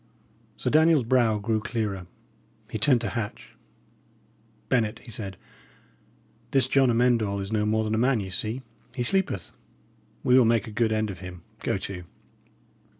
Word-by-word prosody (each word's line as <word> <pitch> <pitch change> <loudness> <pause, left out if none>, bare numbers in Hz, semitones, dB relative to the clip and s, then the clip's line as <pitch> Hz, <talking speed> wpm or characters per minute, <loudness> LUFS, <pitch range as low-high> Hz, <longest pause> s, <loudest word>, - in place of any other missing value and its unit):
Sir - - -1
Daniel's 155 -2 +5
brow 115 -2 +3
grew 110 +2 0
clearer. 105 -5 -3 0.6
He 110 - -3
turned 120 +2 +4
to 115 - -2
Hatch. 110 0 -5 1.1
"Bennet," 115 -4 +1
he 115 - -12
said, 100 -4 -5 1.1
"this 135 -1 +3
John 135 -2 +4
Amend 120 0 +3
All 100 -1 -1
is 100 +1 -5
no 105 -1 +1
more 110 +1 +2
than 110 0 -2
a 110 - +1
man, 125 0 +3
ye 95 -2 -5
see. 110 +7 -2 0.3
He 125 - -1
sleepeth. 120 - 0 0.7
We 125 - +4
will 125 - +5
make 115 -2 +2
a 110 - -8
good 110 +1 +1
end 110 -1 0
of 90 - -9
him, 90 -2 -9 0.2
go - - -1
to!" 90 -3 -6
110 Hz, 165 wpm, -26 LUFS, 105-120 Hz, 1.1 s, Daniel's